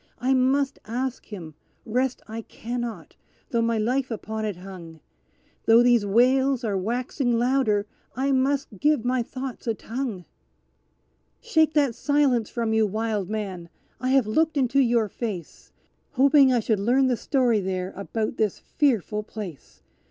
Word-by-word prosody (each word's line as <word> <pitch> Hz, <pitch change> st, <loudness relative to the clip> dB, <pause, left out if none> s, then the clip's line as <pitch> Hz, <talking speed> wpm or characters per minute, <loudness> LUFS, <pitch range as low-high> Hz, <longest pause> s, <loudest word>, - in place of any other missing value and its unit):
I 255 Hz, +4 st, +1 dB
must 270 Hz, +2 st, +2 dB
ask 250 Hz, +3 st, -3 dB
him 170 Hz, -7 st, -8 dB, 0.3 s
rest 255 Hz, +3 st, -1 dB
I 225 Hz, +1 st, -5 dB
cannot 240 Hz, +1 st, -6 dB, 0.4 s
though 235 Hz, -2 st, +2 dB
my 230 Hz, 0 st, +1 dB
life 250 Hz, +5 st, 0 dB
upon 220 Hz, -1 st, -4 dB
it 210 Hz, -3 st, -2 dB
hung 175 Hz, -3 st, -10 dB, 0.7 s
Though 230 Hz, +1 st, +7 dB
these 240 Hz, -4 st, +4 dB
wails 255 Hz, +4 st, +3 dB
are 210 Hz, -3 st, -1 dB
waxing 240 Hz, +4 st, -1 dB
louder, 240 Hz, -4 st, +2 dB, 0.3 s
I 270 Hz, +3 st, 0 dB
must 270 Hz, -5 st, 0 dB
give 295 Hz, -6 st, +2 dB
my 250 Hz, 0 st, +1 dB
thoughts 255 Hz, +1 st, -7 dB
a 225 Hz, -, +1 dB
tongue. 225 Hz, -6 st, -5 dB, 1.1 s
"Shake 320 Hz, -9 st, +2 dB
that 285 Hz, -5 st, +3 dB
silence 275 Hz, -5 st, +1 dB
from 230 Hz, -2 st, -1 dB
you, 220 Hz, -1 st, +3 dB
wild 215 Hz, -2 st, -2 dB
man! 195 Hz, -6 st, -4 dB, 0.3 s
I 255 Hz, -, -1 dB
have 265 Hz, -3 st, +4 dB
looked 315 Hz, +8 st, +1 dB
into 260 Hz, 0 st, +2 dB
your 235 Hz, -4 st, +3 dB
face, 200 Hz, -6 st, -6 dB, 0.4 s
Hoping 275 Hz, 0 st, +5 dB
I 245 Hz, -2 st, +2 dB
should 215 Hz, -2 st, 0 dB
learn 250 Hz, +6 st, +3 dB
the 255 Hz, -1 st, +2 dB
story 245 Hz, -1 st, +1 dB
there 185 Hz, -1 st, -3 dB
about 215 Hz, +3 st, -3 dB
this 215 Hz, -3 st, 0 dB
fearful 225 Hz, -, 0 dB
place. 185 Hz, -, -9 dB
235 Hz, 150 wpm, -25 LUFS, 215-265 Hz, 1.1 s, Though